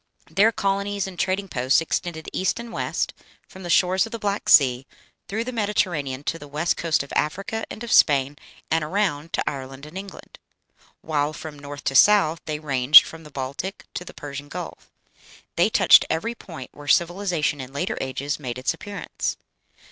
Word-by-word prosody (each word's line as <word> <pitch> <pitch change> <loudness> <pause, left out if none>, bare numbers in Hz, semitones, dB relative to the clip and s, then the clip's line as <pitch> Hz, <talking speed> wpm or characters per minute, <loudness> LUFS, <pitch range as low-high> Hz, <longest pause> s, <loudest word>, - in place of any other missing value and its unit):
Their 215 +3 +4
colonies 200 -1 -1
and 185 -3 -9
trading 195 +1 0
posts 130 -5 +2
extended 165 0 -3
east 190 +4 0
and 235 0 -8
west - - -2 0.3
from 190 - -13
the 175 - -7
shores 185 +4 +3
of - - -13
the 230 - -4
Black 205 -1 -2
Sea, 130 -2 +5 0.4
through 220 +3 -2
the 255 - -5
Mediterranean 175 - -1
to 165 - -2
the 145 - -10
west 155 +4 0
coast 165 -4 0
of 140 - -11
Africa 195 +8 -1
and 225 - -8
of 235 - -5
Spain, 140 -1 +4 0.4
and 160 -1 +2
around 165 -3 -1
to - - -1
Ireland 135 0 -5
and 155 +3 -13
England; 195 0 -9 0.6
while 150 -1 -1
from 150 -1 -9
north 145 0 -9
to - - -1
south 165 0 +5
they 155 -1 -3
ranged 140 -2 +7
from 165 0 -10
the 150 - -12
Baltic 140 +8 -5
to - - -4
the - - -12
Persian 145 0 -7
Gulf. - - -8 0.7
They - - +3
touched - - +6
every 220 +9 -1
point 165 - -10
where 145 0 -12
civilization 170 -4 +1
in 130 0 -9
later 140 - -2
ages 140 +3 -3
made 125 -4 -5
its 130 - 0
appearance. 200 +4 -5
160 Hz, 180 wpm, -23 LUFS, 145-195 Hz, 0.7 s, ranged